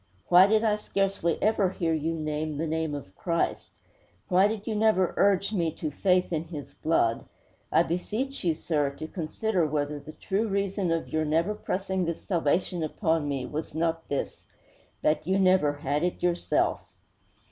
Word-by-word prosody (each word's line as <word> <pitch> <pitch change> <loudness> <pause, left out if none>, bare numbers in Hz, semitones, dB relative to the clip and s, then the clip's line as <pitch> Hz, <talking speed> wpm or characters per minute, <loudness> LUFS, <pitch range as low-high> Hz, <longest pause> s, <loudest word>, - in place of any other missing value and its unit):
Why 180 +2 +8
did 215 +1 +3
I 210 -2 +2
scarcely 195 -5 0
ever 210 -3 +3
hear 170 -3 -1
you 160 +1 -1
name 155 -1 -3
the 160 - -1
name 160 -1 -1
of 115 -10 -8
Christ? 170 -1 -1 0.6
Why 185 +2 +5
did 215 -1 -4
you 225 - -2
never 210 -4 +2
urge 200 +1 +2
me 170 -5 +1
to 155 -2 -4
faith 180 +3 +1
in 160 0 -1
His 155 -4 -8
blood? 115 -8 +1 0.5
I 165 - +5
beseech 215 +11 -3
you, 165 -3 +2
sir, 150 -3 0
to 155 - -6
consider 175 +2 -1
whether 145 0 -2
the 155 +2 -11
true 205 +3 -1
reason 195 -2 -1
of 165 -1 -1
your 155 0 0
never 165 +6 +1
pressing 190 -2 -2
this 170 -1 -4
salvation 175 0 0
upon 160 -1 0
me 135 -3 -2
was 150 +3 -5
not 165 0 -1
this 140 - -4 0.6
that 155 +1 +1
you 190 +1 +2
never 185 -6 +4
had 145 0 -2
it 180 0 -2
yourself!' 175 -1 +1
170 Hz, 170 wpm, -27 LUFS, 155-195 Hz, 0.6 s, Why